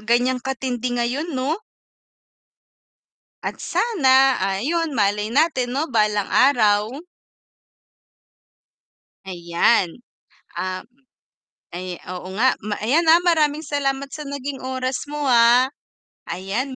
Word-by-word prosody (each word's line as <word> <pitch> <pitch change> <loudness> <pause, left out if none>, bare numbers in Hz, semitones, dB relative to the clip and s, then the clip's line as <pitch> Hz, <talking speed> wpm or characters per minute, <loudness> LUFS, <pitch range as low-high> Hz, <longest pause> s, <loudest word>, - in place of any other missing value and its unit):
ganiyan 245 +3 +1
katindi 250 -1 -3
ngayon 265 +6 -2
'no? 285 +10 -1 1.8
At - - -4
sana, 270 - +3
ayun, 280 - -1
malay 210 -1 0
natin 265 -4 +1
'no, 300 +4 -1
balang 210 -2 +1
araw. 215 -4 +3 2.3
Ayan, 175 +3 0 0.6
ah 185 0 -3 0.9
ay, 180 +1 -6 0.2
oo 185 0 -7
nga, 255 +4 +3
ma 210 -1 -3
ayan, 285 +10 +3
ah, 335 - +7
maraming 310 -3 +2
salamat 275 -2 -2
sa 300 - -6
naging 280 -1 -5
oras 260 0 -3
mo, 295 0 -4
ah. 240 +2 +5 0.6
Ayan. 195 +8 -3
255 Hz, 100 wpm, -21 LUFS, 210-280 Hz, 2.3 s, ah